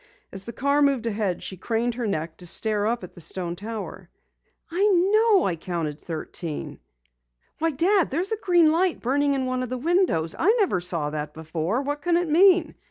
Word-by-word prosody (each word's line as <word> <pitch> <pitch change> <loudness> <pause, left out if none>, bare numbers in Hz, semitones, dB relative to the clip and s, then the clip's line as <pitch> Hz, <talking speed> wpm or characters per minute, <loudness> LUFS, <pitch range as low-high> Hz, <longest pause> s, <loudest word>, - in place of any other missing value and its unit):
As 195 0 -8
the 235 - -6
car 280 +4 +1
moved 275 -5 +2
ahead, 205 -5 -2
she 190 - -7
craned 230 +5 -1
her 235 -1 -3
neck 160 -4 -3
to 180 - -6
stare 210 +3 0
up 235 -2 -1
at 180 - -9
the 175 - -10
stone 170 +1 -3
tower. 215 +2 -7 0.6
"I 360 +4 0
know 405 +2 +4
I 180 - 0
counted 160 -3 -4
thirteen. 160 -1 -6 0.8
Why, 330 +1 +2
Dad, 345 +5 +2
there's 350 +9 -1
a 445 - 0
green 350 -6 +4
light 350 +2 +1
burning 280 +3 +1
in 265 -1 -1
one 255 0 -1
of 255 - -4
the 255 - -3
windows! 310 - +1
I 420 +7 +4
never 365 - +1
saw 165 -4 -2
that 150 0 -5
before. 160 - -2
What 290 +1 -3
can 345 +1 +2
it 350 0 0
mean?" 350 0 +4
245 Hz, 195 wpm, -24 LUFS, -, 0.8 s, know